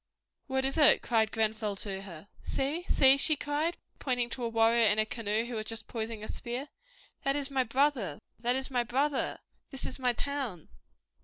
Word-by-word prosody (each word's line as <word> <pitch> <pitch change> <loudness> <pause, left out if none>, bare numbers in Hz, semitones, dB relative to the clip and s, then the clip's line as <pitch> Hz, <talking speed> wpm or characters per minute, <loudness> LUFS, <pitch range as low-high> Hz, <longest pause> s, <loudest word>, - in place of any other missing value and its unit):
"What 265 -1 0
is 270 +4 0
it?" 295 - +6
cried 220 -2 +2
Grenfell 220 -2 -1
to 195 -1 -3
her. 180 -2 -11
"See 290 +6 -2
see!" 270 0 +6
she 310 +2 +4
cried, 295 +4 -1 0.2
pointing 245 -3 -1
to 250 - -3
a 235 - 0
warrior 230 0 +4
in 210 0 +3
a 215 - +3
canoe 220 0 -2
who 240 - -6
was 215 -1 -4
just 225 -1 -3
poising 225 -2 -5
a - - -6
spear, 250 +4 -5 0.5
"that 275 0 0
is 285 -1 -3
my 265 -1 +2
brother! 250 - 0 0.2
That 245 +2 +1
is 265 +1 -2
my 250 -2 +2
brother! 270 +4 0 0.3
This 270 - -5
is 260 - -5
my 250 -2 +2
town!" 255 - -3
240 Hz, 190 wpm, -30 LUFS, 220-275 Hz, 0.5 s, it